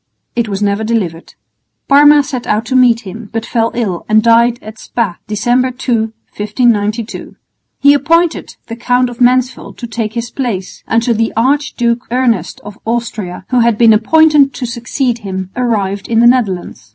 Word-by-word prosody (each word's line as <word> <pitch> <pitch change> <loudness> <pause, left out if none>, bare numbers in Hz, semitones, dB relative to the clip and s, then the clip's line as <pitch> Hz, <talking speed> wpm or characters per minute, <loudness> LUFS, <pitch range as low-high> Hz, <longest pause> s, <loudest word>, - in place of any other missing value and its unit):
It 235 -2 -1
was 200 0 -2
never 200 +1 0
delivered. 195 -8 -3 0.5
Parma 290 +1 +6
set 260 -4 -5
out 215 +2 0
to 260 +2 -2
meet 245 -2 +4
him, 210 +2 -9
but 225 0 -3
fell 230 -1 0
ill 200 -8 -2
and 215 0 +4
died 235 +1 +4
at 215 +1 -10
Spa, 210 -8 -3
December 245 +5 +1
2, 255 0 -3 0.4
1592. 215 0 -1 0.4
He 285 +1 +5
appointed 330 +4 +1
the 230 - -7
Count 245 +1 0
of 240 - -11
Mansfeld 250 +1 +1
to 240 - -6
take 225 -2 -4
his 235 0 -4
place, 215 -8 -4
until 230 +1 +1
the 225 0 0
Archduke 245 -2 0
Ernest 245 -1 0
of 205 0 -11
Austria, 220 -6 -4
who 250 - +3
had 235 -2 +2
been 230 -1 +6
appointed 290 +4 +4
to 255 - -4
succeed 240 +1 -2
him, 190 -3 -6
arrived 205 -5 -1
in 225 -1 +1
the 235 - +5
Netherlands. 200 - 0
235 Hz, 165 wpm, -14 LUFS, 215-250 Hz, 0.5 s, Parma